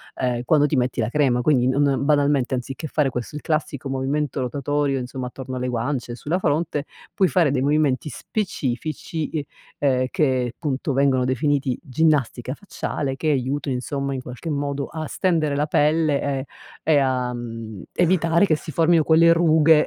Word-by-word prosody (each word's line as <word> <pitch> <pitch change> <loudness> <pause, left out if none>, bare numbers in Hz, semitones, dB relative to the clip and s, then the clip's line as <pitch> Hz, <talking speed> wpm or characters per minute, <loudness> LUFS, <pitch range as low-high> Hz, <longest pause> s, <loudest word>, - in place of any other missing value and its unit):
ehm, 125 -2 -1
quando 145 +3 +4
ti 150 - 0
metti 125 -1 0
la 110 -1 +1
crema. 130 -3 +2
Quindi 125 -2 +3
non 140 0 +2
banalmente, 145 -3 +2
anziché 130 +4 -4
fare 150 -1 +1
questo, 125 +3 -5
il - - -7
classico 155 -3 -2
movimento 135 +1 -1
rotatorio, 140 +1 -1
insomma, 130 0 -5
attorno 130 +1 -7
alle 125 0 -2
guance 125 +1 -2
e - - -6
sulla 160 +8 -2
fronte, 150 -3 0 0.3
puoi 190 - +3
fare 160 -1 +3
dei 130 -2 0
movimenti 145 0 +1
specifici, 155 - -3
uhm, 155 -3 -1 0.4
ehm, 130 -1 +2
che 130 -5 0
punto 140 -2 -2
vengono 130 -1 +2
definiti 130 0 0
ginnastica 135 -4 0
facciale, 150 -8 -4
che 155 +3 -1
aiutano, 135 0 -1
insomma, 140 +2 -3
in 130 - -4
qualche 125 +6 -7
modo 140 -1 -2
a 160 0 -5
stendere 160 -6 0
la 150 +1 0
pelle, 150 -1 +2
ehm, 135 -2 -1 0.4
e 155 -2 +4
a, 130 -2 +1
mhmm, 115 -4 -7
evitare 170 0 +3
che 155 - +3
si 155 +1 -7
formino 165 0 +3
quelle 165 +2 +5
rughe 160 -2 +5
140 Hz, 170 wpm, -23 LUFS, 130-155 Hz, 0.4 s, quelle